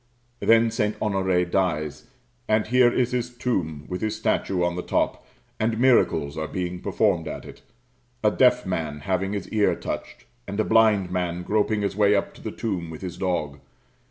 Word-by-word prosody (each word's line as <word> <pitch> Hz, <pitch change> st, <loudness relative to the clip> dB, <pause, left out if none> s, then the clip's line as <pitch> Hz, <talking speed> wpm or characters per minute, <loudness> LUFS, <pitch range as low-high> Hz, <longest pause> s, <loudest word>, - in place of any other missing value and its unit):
Then 115 Hz, 0 st, +4 dB
St. 105 Hz, -1 st, -1 dB
Honoré 95 Hz, -3 st, +1 dB
dies; 80 Hz, -5 st, -1 dB, 0.4 s
and 110 Hz, 0 st, +2 dB
here 125 Hz, +1 st, +4 dB
is 125 Hz, 0 st, +1 dB
his 125 Hz, -1 st, -1 dB
tomb 90 Hz, -12 st, -3 dB
with 90 Hz, -1 st, -4 dB
his 110 Hz, 0 st, -1 dB
statue 95 Hz, -4 st, 0 dB
on 85 Hz, 0 st, 0 dB
the 90 Hz, -, -3 dB
top; -, -, -1 dB, 0.4 s
and 110 Hz, +1 st, 0 dB
miracles 100 Hz, -, +3 dB
are 80 Hz, -, -2 dB
being 90 Hz, 0 st, -4 dB
performed 95 Hz, -6 st, +1 dB
at -, -, -6 dB
it -, -, -12 dB, 0.6 s
a 105 Hz, -, +4 dB
deaf 125 Hz, +1 st, +4 dB
man 80 Hz, -5 st, -3 dB
having 95 Hz, +4 st, -1 dB
his 100 Hz, -, -4 dB
ear 105 Hz, -2 st, +2 dB
touched, -, -, -6 dB, 0.2 s
and 100 Hz, -, -4 dB
a -, -, +4 dB
blind 110 Hz, -5 st, +3 dB
man 90 Hz, -1 st, -2 dB
groping 105 Hz, +2 st, +1 dB
his 100 Hz, -, -1 dB
way 105 Hz, 0 st, +4 dB
up 100 Hz, -, -1 dB
to -, -, -15 dB
the -, -, -4 dB
tomb 95 Hz, -7 st, -3 dB
with 80 Hz, -, -9 dB
his 90 Hz, -2 st, -5 dB
dog. 75 Hz, -7 st, -2 dB
100 Hz, 185 wpm, -24 LUFS, 90-110 Hz, 0.6 s, Then